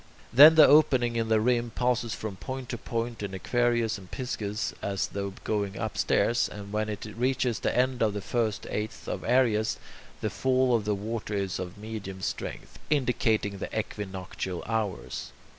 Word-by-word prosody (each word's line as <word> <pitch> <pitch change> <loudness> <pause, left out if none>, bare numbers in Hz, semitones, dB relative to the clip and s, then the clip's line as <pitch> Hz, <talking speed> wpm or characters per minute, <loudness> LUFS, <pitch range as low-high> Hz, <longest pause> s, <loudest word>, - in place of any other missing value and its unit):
Then 150 +6 +10
the 160 - +9
opening 130 -6 +5
in 115 -1 0
the 110 -1 +4
rim 120 +1 +1
passes 125 0 0
from 110 -3 -5
point 130 +6 -6
to 120 - -3
point 115 -1 -3
in 100 -2 -4
Aquarius 120 +1 +1
and 95 -1 -14
Pisces, 105 -5 -3
as 100 -1 -1
though 100 -1 -4
going 100 -2 -1
upstairs, 120 0 +1
and 100 0 -9
when 110 0 0
it 105 0 -5
reaches 125 -2 0
the - - -1
end 125 0 +2
of 110 -2 +3
the - - -1
first 110 0 -1
eighth 105 +1 -4
of - - -3
Aries, 115 -3 +2 0.4
the - - -2
fall 130 -1 +2
of 110 -3 0
the 105 -1 +1
water 105 +1 -4
is 100 -2 -2
of 90 0 -6
medium 105 -3 -7
strength, 95 - -5
indicating 120 -8 +1
the - - -4
equinoctial 95 -4 -5
hours. 110 -4 -3
110 Hz, 170 wpm, -28 LUFS, 100-120 Hz, 0.4 s, Then